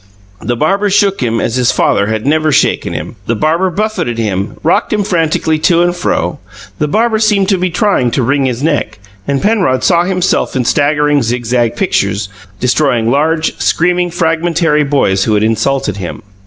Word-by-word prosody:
The 120 - -2
barber 195 - +1
shook 200 -2 +1
him 115 -2 0
as 120 - -1
his 125 -1 +2
father 100 - +1
had 110 +1 -2
never 155 +2 +1
shaken - - +1
him; 85 +9 -6
the 115 - 0
barber 165 - +1
buffeted 200 - -2
him, 100 -3 -2
rocked 165 - +1
him 210 -1 +1
frantically 160 -4 0
to 170 +2 +3
and 175 0 0
fro; 90 - -2 0.4
the 150 - 0
barber 220 +6 +1
seemed 205 -3 +2
to 195 -3 +2
be 185 0 0
trying 180 - +1
to 130 - +1
wring 135 +3 +1
his 125 0 -2
neck; 145 -9 -1 0.3
and 140 -1 -1
Penrod 195 -11 +1
saw 170 -1 +3
himself 185 -4 0
in 125 -2 0
staggering 145 +1 +2
zigzag 120 0 -1
pictures, 100 - -1 0.3
destroying 125 -3 +1
large, 155 +3 0
screaming, 180 +1 +1
fragmentary 165 -2 +1
boys 135 -10 +1
who 110 - +1
had 105 - +1
insulted 115 0 0
him. 90 -3 -6
150 Hz, 175 wpm, -13 LUFS, 120-175 Hz, 0.4 s, to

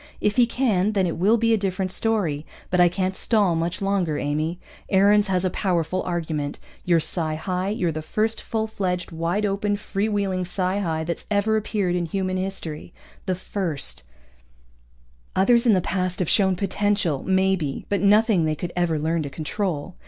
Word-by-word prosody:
If 210 - +1
he 245 -1 +5
can, 215 -5 +1
then 195 -3 +2
it 170 - -1
will 205 +7 +4
be 230 0 +2
a 220 - +2
different 190 -1 -1
story. 190 -9 0 0.3
But 180 - +2
I 175 - +6
can't 185 +1 -1
stall 205 -7 +2
much 170 +4 -2
longer, 190 -6 0
Amy. 155 +5 -2 0.3
Aarons 205 +2 +4
has 185 -1 0
a 185 - +1
powerful 180 -2 0
argument. 160 -5 -3 0.3
You're 170 -2 +3
psi 160 -1 -1
high. 185 +3 -2
You're 185 -5 0
the 155 0 -4
first 215 +7 -1
full 220 -1 -2
fledged, 185 -5 -3
wide 170 +6 -1
open, 205 +1 0
free 205 +1 -2
wheeling 195 -3 0
psi 185 +2 -1
high 160 -5 -1
that's 170 +1 -4
ever 210 +1 +2
appeared 210 -4 0
in 175 -1 -1
human 185 +2 -2
history. 180 -4 -4 0.3
The 185 - +1
first. 175 - -3 1.3
Others 235 +5 +4
in 225 - +6
the 185 - +3
past 185 0 -2
have 180 - -1
shown 190 0 +3
potential, 200 -5 0
maybe, 190 -6 0
but 200 -3 0
nothing 205 -3 +4
they 155 0 0
could 175 +3 -5
ever 175 -3 +1
learn 160 +2 0
to 145 - -4
control. 160 +3 -3
185 Hz, 180 wpm, -24 LUFS, 170-205 Hz, 1.3 s, I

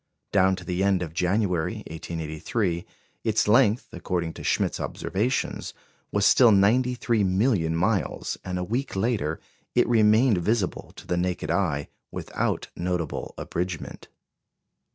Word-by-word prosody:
Down 95 -1 +4
to 90 - -9
the 90 +2 -1
end 95 -2 +2
of 80 -2 -7
January, 90 -1 0
1883, 85 +3 -3 0.4
its 110 -1 +1
length, 115 0 +4
according 85 -2 -3
to - - -9
Schmidt's - - 0
observations, 120 +7 -2 0.4
was 100 0 +2
still 120 -3 +7
93 115 +2 +3
million 95 -4 +2
miles; 95 +4 0
and 90 -1 -3
a 90 - -1
week 120 +7 -2
later 95 -7 0 0.4
it - - +4
remained 110 -1 +4
visible 105 +2 -1
to - - -12
the 90 - -1
naked 90 -3 -1
eye, 80 -6 0 0.2
without - - -2
notable 90 -3 -3
abridgment. 90 -1 -4
95 Hz, 130 wpm, -26 LUFS, 85-110 Hz, 0.4 s, still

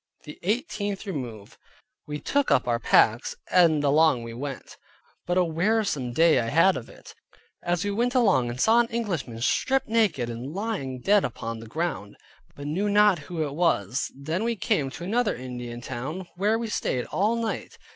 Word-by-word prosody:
THE 150 - -11
EIGHTEENTH 205 - -2
REMOVE 120 - -6 0.5
We 150 0 -4
took 285 - 0
up 125 - +3
our 120 -1 +1
packs 110 0 +3 0.2
and 165 -5 +4
along 145 -3 +3
we 115 0 -7
went, 135 +2 -7 0.5
but 175 +1 +1
a 185 - +5
wearisome 170 - 0
day 160 +2 +4
I 115 - -1
had 165 +9 +4
of 120 - -7
it. - - -14 0.5
As 175 +2 -1
we 205 - 0
went 240 +5 0
along 200 - +3
I 120 - -4
saw 220 - +4
an 240 - +3
Englishman 180 - -3
stripped 265 - +1
naked, 215 - +1
and 120 +6 -6
lying 190 - -3
dead 205 +4 +4
upon 115 -1 -4
the 115 - -10
ground, 155 -7 -3 0.4
but 145 - -8
knew 185 +8 -1
not 205 -3 +5
who 165 -3 -2
it 145 -2 -4
was. 130 - 0
Then 155 +8 -3
we 235 0 0
came 145 -8 0
to 155 - -9
another 220 +4 0
Indian 125 -1 -7
town, 135 +10 -5
where 205 +5 +1
we 230 0 -3
stayed 125 - -1
all 210 +4 +1
night. 230 -1 -4
165 Hz, 180 wpm, -26 LUFS, 125-205 Hz, 0.5 s, a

